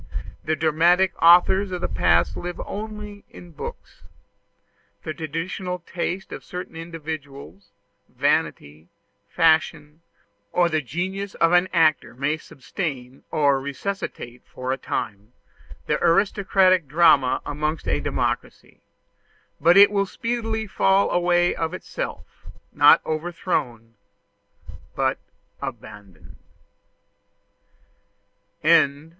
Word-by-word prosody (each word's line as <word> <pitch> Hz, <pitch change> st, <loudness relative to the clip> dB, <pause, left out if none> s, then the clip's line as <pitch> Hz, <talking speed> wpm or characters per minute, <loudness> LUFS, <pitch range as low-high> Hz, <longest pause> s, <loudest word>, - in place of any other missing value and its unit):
The 155 Hz, -, 0 dB
dramatic 170 Hz, +4 st, +3 dB
authors 180 Hz, +4 st, +5 dB
of 180 Hz, -, -3 dB
the -, -, -1 dB
past 85 Hz, +1 st, +2 dB
live 175 Hz, 0 st, -6 dB
only 210 Hz, -1 st, -7 dB
in 175 Hz, -, -13 dB
books. 475 Hz, -, -9 dB, 1.0 s
The 155 Hz, -, -4 dB
traditional 165 Hz, +4 st, -4 dB
taste 180 Hz, +2 st, -4 dB
of -, -, -8 dB
certain 180 Hz, -2 st, -8 dB
individuals, 145 Hz, -, -8 dB, 0.4 s
vanity, 75 Hz, +3 st, -1 dB, 0.4 s
fashion, 160 Hz, -2 st, +1 dB, 0.5 s
or 175 Hz, -1 st, +2 dB
the 155 Hz, -1 st, 0 dB
genius 185 Hz, -, -4 dB
of 165 Hz, 0 st, +2 dB
an 180 Hz, +1 st, +3 dB
actor 155 Hz, -6 st, +2 dB
may 140 Hz, +4 st, -1 dB
sustain 135 Hz, -4 st, -6 dB
or 140 Hz, -3 st, +2 dB
resuscitate 140 Hz, -4 st, -6 dB
for 130 Hz, 0 st, -6 dB
a 135 Hz, -, -1 dB
time 105 Hz, 0 st, -5 dB, 0.5 s
the -, -, -1 dB
aristocratic 185 Hz, -1 st, +3 dB
drama 145 Hz, -4 st, +4 dB
amongst 150 Hz, +2 st, -3 dB
a -, -, +1 dB
democracy; -, -, -4 dB, 0.8 s
but 170 Hz, +5 st, +5 dB
it 200 Hz, +1 st, +8 dB
will 200 Hz, -1 st, 0 dB
speedily 225 Hz, 0 st, -3 dB
fall 195 Hz, -1 st, +2 dB
away 175 Hz, 0 st, +2 dB
of 165 Hz, -1 st, -3 dB
itself -, -, -7 dB, 0.3 s
not -, -, +6 dB
overthrown, 155 Hz, -8 st, -3 dB, 1.0 s
but -, -, 0 dB, 0.4 s
abandoned. 100 Hz, -6 st, -10 dB
165 Hz, 100 wpm, -23 LUFS, 140-185 Hz, 1.0 s, it